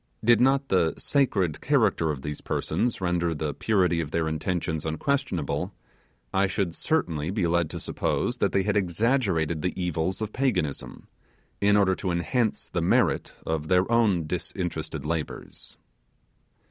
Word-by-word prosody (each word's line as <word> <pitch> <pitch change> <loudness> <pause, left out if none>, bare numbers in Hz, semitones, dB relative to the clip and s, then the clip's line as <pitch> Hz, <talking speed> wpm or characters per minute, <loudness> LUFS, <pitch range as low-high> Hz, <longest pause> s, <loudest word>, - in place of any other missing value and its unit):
Did 120 +1 +5
not 135 +1 +3
the 85 -4 +2
sacred 100 - +1
character 110 - +2
of 70 -3 -3
these 75 0 -5
persons 120 -4 -1
render 85 -2 0
the 75 -1 -2
purity 90 -6 +2
of 75 - -4
their 80 +1 0
intentions 80 0 -2
unquestionable, 80 - -1 0.6
I 95 +1 +3
should 95 -3 -1
certainly 85 - 0
be 95 -1 0
led 85 -1 +1
to - - -5
suppose - - -1
that - - +2
they 95 - +2
had 105 +1 0
exaggerated 95 - +1
the 90 +2 -2
evils 90 +1 -1
of 110 -1 -4
Paganism, 90 - -2 0.5
in 100 0 +5
order 95 -2 +4
to 95 - -3
enhance 100 +7 0
the - - -2
merit - - +2
of 80 -1 -2
their 90 +5 +2
own 105 -8 +3
disinterested 80 -3 -4
labours. 80 0 -5
90 Hz, 145 wpm, -26 LUFS, 80-105 Hz, 0.6 s, Did